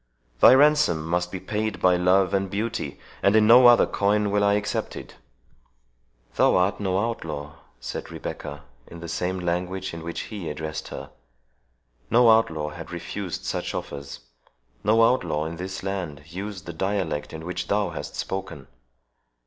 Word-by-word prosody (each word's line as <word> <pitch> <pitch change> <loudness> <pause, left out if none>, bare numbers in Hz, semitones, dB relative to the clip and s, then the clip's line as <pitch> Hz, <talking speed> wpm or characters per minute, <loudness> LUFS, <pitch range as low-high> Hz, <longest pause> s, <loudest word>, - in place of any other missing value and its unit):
The 130 - +8
ransom 145 - +4
must 90 +1 -1
be 95 - -4
paid 105 +1 -3
by 90 -1 +4
love 90 +1 +3
and 95 0 0
beauty, 105 +4 -3 0.2
and 100 +2 +4
in 110 -1 +6
no 120 +3 +8
other 120 -1 +7
coin 105 0 +1
will 100 0 +2
I 100 0 +4
accept 105 0 -2
it." - - -10 1.2
"Thou - - +4
art 90 +2 +2
no 95 -2 0
outlaw," 80 -10 -3 0.2
said - - -6
Rebecca, 75 0 -7 0.2
in 85 - -10
the 85 - -7
same 90 +3 -2
language 90 +2 -2
in 85 - -6
which 85 0 -4
he 100 -7 -6
addressed 80 0 -5
her; - - -8 1.0
"no 120 -1 +6
outlaw 80 -9 +2
had 80 +2 -9
refused 90 +2 -5
such - - -3
offers. 70 -1 -6 0.6
No 110 +1 +4
outlaw 85 -11 +2
in 80 +1 -5
this 95 +1 -6
land 90 -7 -4
uses 95 +2 -7
the 85 - -7
dialect 95 -3 -2
in 80 0 -8
which 90 +1 -4
thou 105 0 +1
hast - - -7
spoken. 95 -8 -5
95 Hz, 160 wpm, -25 LUFS, 85-105 Hz, 1.2 s, The